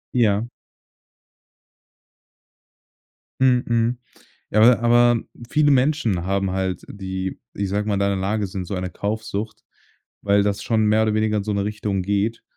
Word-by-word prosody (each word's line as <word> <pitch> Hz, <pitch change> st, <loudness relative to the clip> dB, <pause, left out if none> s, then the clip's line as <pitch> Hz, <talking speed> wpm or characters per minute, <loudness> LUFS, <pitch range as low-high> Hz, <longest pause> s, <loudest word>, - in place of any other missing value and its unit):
Ja. 110 Hz, -3 st, +2 dB, 3.0 s
Mhm, 125 Hz, -2 st, +4 dB
mhm. 115 Hz, +1 st, +1 dB, 0.5 s
Ja, 110 Hz, -, +3 dB
aber 115 Hz, +1 st, +6 dB
aber 120 Hz, 0 st, +4 dB, 0.3 s
viele 150 Hz, -1 st, +3 dB
Menschen 125 Hz, -, +1 dB
haben 95 Hz, 0 st, 0 dB
halt 95 Hz, -1 st, -2 dB
die, 95 Hz, -1 st, -5 dB
ich 100 Hz, -1 st, -2 dB
sage 105 Hz, +2 st, -1 dB
mal, 105 Hz, -, +1 dB
in 100 Hz, -, -1 dB
deiner 100 Hz, 0 st, +1 dB
Lage 100 Hz, +2 st, -1 dB
sind, 95 Hz, 0 st, -5 dB
so 95 Hz, -, -5 dB
eine 90 Hz, 0 st, -3 dB
Kaufsucht, 110 Hz, +1 st, -4 dB, 0.6 s
weil 100 Hz, 0 st, +3 dB
das 100 Hz, 0 st, -1 dB
schon 110 Hz, -2 st, +1 dB
mehr 110 Hz, +1 st, +3 dB
oder 110 Hz, -1 st, +1 dB
weniger 110 Hz, 0 st, +1 dB
in 100 Hz, -, -3 dB
so 105 Hz, -, -2 dB
'ne 100 Hz, -1 st, -1 dB
Richtung 105 Hz, -2 st, -2 dB
geht. 100 Hz, +4 st, -1 dB
105 Hz, 155 wpm, -22 LUFS, 100-115 Hz, 3.0 s, aber